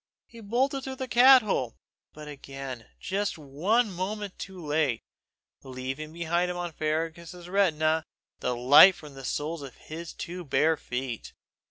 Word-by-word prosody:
He 230 - -14
bolted 255 +6 0
through 265 0 -5
the 260 0 -5
cat 255 +1 +7
hole 130 - -1 0.4
but 150 0 -11
again 135 -4 -8
just 200 -1 -2
one 185 - 0
moment 195 +2 -4
too 190 -2 -8
late, 145 -5 0 0.6
leaving 130 +4 -6
behind 170 +2 0
him 180 - -4
on 175 -1 -4
Fergus's 165 +3 -3
retina 160 -5 +2 0.4
the 125 - -1
light 140 +10 +8
from 150 -2 -12
the 135 0 -10
soles 150 +4 -3
of 135 -2 -9 0.4
two 180 +1 -6
bare 160 +2 +2
feet. 125 -4 -5
160 Hz, 145 wpm, -27 LUFS, 140-195 Hz, 0.6 s, light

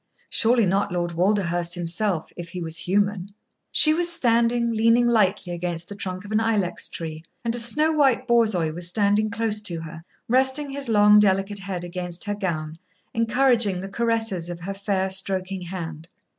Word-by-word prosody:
Surely 230 0 +3
not 195 +1 0
Lord 175 -1 -2
Walderhurst 175 -1 0
himself, 175 0 -2
if 170 -1 -8
he 180 - -6
was 165 -2 -5
human. 200 +3 -1 0.4
She 310 - +5
was 345 +1 +2
standing, 235 -5 +2
leaning 230 +2 +3
lightly 200 -5 +1
against 170 -1 -4
the 205 - -7
trunk 185 -1 -5
of 205 - -10
an 215 - +2
ilex 215 -5 0
tree, 160 -1 -6 0.2
and 230 - 0
a 240 - +2
snow 300 +7 +2
white 270 -5 +2
Borzoi 215 -10 +2
was 175 +1 -3
standing 205 +3 +2
close 225 -1 0
to 170 -6 -3
her, 165 0 -9 0.2
resting 265 +3 +2
his 275 -2 -2
long, 210 -1 +6
delicate 195 0 +1
head 190 -2 -5
against 175 0 -3
her 205 - -2
gown, 160 -5 -4 0.3
encouraging 230 -4 +2
the 195 +1 -6
caresses 225 -5 -1
of 175 0 -7
her 195 +3 -4
fair, 195 -1 -1
stroking 190 0 -2
hand. 165 -3 -7
200 Hz, 170 wpm, -23 LUFS, 175-230 Hz, 0.4 s, long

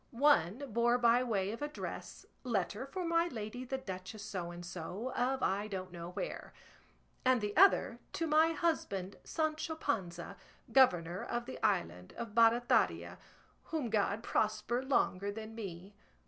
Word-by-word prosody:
One 245 - +3
bore 240 +1 +3
by 240 0 +4
way 200 -5 0
of 230 - -7
address, 295 +1 -6 0.2
Letter 220 0 -1
for 365 +5 -4
my 335 0 +2
lady 230 -3 -5
the 265 +2 -2
Duchess 195 -2 -7
So 185 -5 -4
and 175 0 -8
so, 185 +8 -5
of 260 +2 0
I 200 +2 +1
don't 185 -3 -5
know 170 -1 -7
where; 340 - -5 0.7
and 255 -1 +4
the 210 -1 -3
other 345 -10 +5
To 330 - -1
my 315 +1 +4
husband 200 - -1
Sancho 315 0 -1
Panza, 195 - -3 0.3
governor 180 -9 +4
of 240 0 -3
the 260 - -8
island 90 +2 0
of 230 -3 -5
Barataria, 230 +1 +3 0.5
whom 295 -8 -3
God 210 0 +1
prosper 215 +3 0
longer 205 -7 +1
than 220 +1 -7
me. 195 -3 -7
225 Hz, 145 wpm, -34 LUFS, 190-265 Hz, 0.7 s, other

